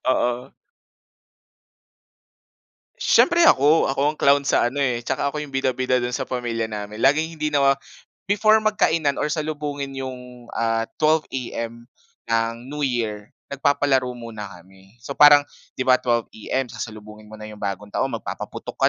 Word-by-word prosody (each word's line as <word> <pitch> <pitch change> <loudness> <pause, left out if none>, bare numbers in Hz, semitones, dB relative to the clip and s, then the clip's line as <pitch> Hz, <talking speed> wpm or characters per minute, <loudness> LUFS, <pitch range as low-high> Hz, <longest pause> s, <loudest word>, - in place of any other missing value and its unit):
Oo. 125 +1 0 2.5
Siyempre 345 0 +4
ako. 150 - +5
Ako 135 - -2
ang - - -20
clown 140 0 +4
sa 120 - +3
ano 140 - -8
eh. 125 -4 0
Tsaka 130 +4 -1
ako 150 - -3
'yong 140 -2 -9
bida-bida 130 -1 +1
do'n 120 0 -2
sa 130 - -4
pamilya 115 -3 -2
namin. 105 +1 -6
Laging 155 +4 +2
hindi 150 0 -1
nawa 140 -2 +4 0.5
before 215 +2 +4
magkainan 180 -9 +1
or 150 - 0
salubungin 150 -3 -3
'yong 125 -2 -8
ah 115 0 -1
12 155 0 +3
AM, 115 -2 -5 0.4
ang 115 +1 -1
New 150 +2 -6
Year, 110 -6 -2 0.2
nagpapalaro 140 -2 +1
muna 110 -4 -8
kami. 95 +3 -17
So 125 +4 -7
parang 145 0 +7 0.3
'di 130 - -2
ba, 130 -1 +4
12 120 -2 +1
AM, 130 +4 -2
sasalubungin 105 -1 -9
mo 110 - -11
na 105 - -9
'yong 105 -1 -11
bagong 100 +1 -5
taon 135 - 0
magpapaputok - - -7
130 Hz, 150 wpm, -22 LUFS, 115-145 Hz, 2.5 s, parang